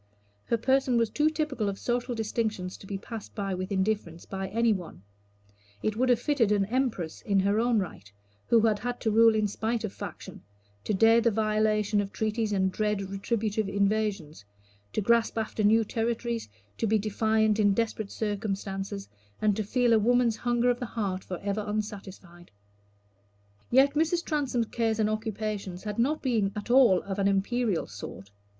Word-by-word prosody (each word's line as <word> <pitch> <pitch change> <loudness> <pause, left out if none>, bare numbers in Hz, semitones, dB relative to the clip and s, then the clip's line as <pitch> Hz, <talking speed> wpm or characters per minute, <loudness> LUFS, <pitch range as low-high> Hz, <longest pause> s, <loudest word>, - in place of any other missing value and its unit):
Her 235 - +1
person 260 +1 +2
was 230 -2 +1
too 300 +5 +2
typical 300 -9 -1
of 195 - -4
social 245 +2 -2
distinctions 215 -4 -2
to 195 - -13
be 195 - -3
passed 220 +2 -9
by 195 -2 -2
with 185 +2 -4
indifference 190 -4 -1
by 190 0 -4
any 230 +3 +2
one: 170 - -7 0.8
it 215 - 0
would 255 +3 +1
have 245 -2 +4
fitted 245 -5 +1
an 205 -1 +3
empress 220 -8 -2
in 200 -3 +2
her 200 +2 +2
own 235 0 +2
right, 165 - -4 0.4
who 230 - +5
had 215 -2 +2
had 245 +3 -4
to 220 - +1
rule 225 +1 +6
in 215 -1 +2
spite 225 +3 -2
of 215 - -4
faction, - - -8 0.4
to 210 - 0
dare 225 +3 +5
the 235 - +3
violation 215 -1 +1
of 200 0 -5
treaties 220 0 -1
and 190 -2 +1
dread 205 -1 -1
retributive 210 +1 -1
invasions, 200 - -1 0.5
to - - -1
grasp 230 +2 +2
after 220 -1 -2
new 220 +2 +5
territories, 230 - -2 0.3
to 225 - +1
be 220 +1 +3
defiant 220 +1 +1
in 205 -2 +4
desperate 220 -2 -1
circumstances, 200 -2 -3 0.3
and 210 -2 +2
to 215 - -1
feel 240 +3 +2
a 225 - +5
woman's 235 0 +2
hunger 240 0 +2
of 245 - -3
the 245 - -4
heart 195 -5 -3
forever 200 +3 -3
unsatisfied. 195 -4 -6 1.2
Yet 270 +3 +5
Mrs. 325 +3 +1
Transome's 275 -6 0
cares 225 -2 0
and 215 -1 +1
occupations 215 -4 -4
had 210 0 -4
not 290 +6 +1
been 220 -7 +1
at 210 +3 -4
all 245 -8 +6
of 200 0 -4
an 195 - +2
imperial 200 +1 0
sort. 100 -1 -9
215 Hz, 175 wpm, -28 LUFS, 200-235 Hz, 1.2 s, rule